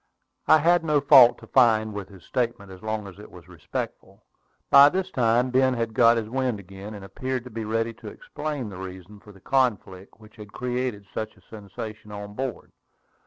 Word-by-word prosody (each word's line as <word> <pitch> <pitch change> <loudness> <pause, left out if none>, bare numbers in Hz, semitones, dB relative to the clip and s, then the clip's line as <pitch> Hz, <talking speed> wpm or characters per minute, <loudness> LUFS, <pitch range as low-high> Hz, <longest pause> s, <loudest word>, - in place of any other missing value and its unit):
I 155 - +7
had 170 +3 +3
no 150 -2 +2
fault 135 -4 +7
to - - -14
find 110 -4 +3
with 100 -1 -7
his 95 -4 -15
statement, 115 -6 -3
as 95 -1 -12
long 110 -1 -3
as 95 -3 -12
it - - -12
was - - -15
respectful. - - -7 0.5
By 140 0 +9
this 190 +3 -3
time 120 -1 +2
Ben 130 0 +3
had 115 -1 -3
got 115 +1 +5
his 110 -2 -3
wind 125 -2 -2
again, 100 +2 -10
and 100 -1 -9
appeared 130 +4 -4
to 125 - -11
be 110 0 -5
ready 115 +1 -1
to 115 - -13
explain 155 - -6
the 95 -2 -9
reason 95 +2 -10
for 105 - -16
the 95 - -17
conflict 105 -7 -1
which 110 +1 -18
had 105 -1 -12
created 125 -4 -3
such 110 0 -5
a - - -21
sensation 105 0 -9
on 105 0 -8
board. 130 +1 -5
115 Hz, 200 wpm, -25 LUFS, 105-130 Hz, 0.5 s, By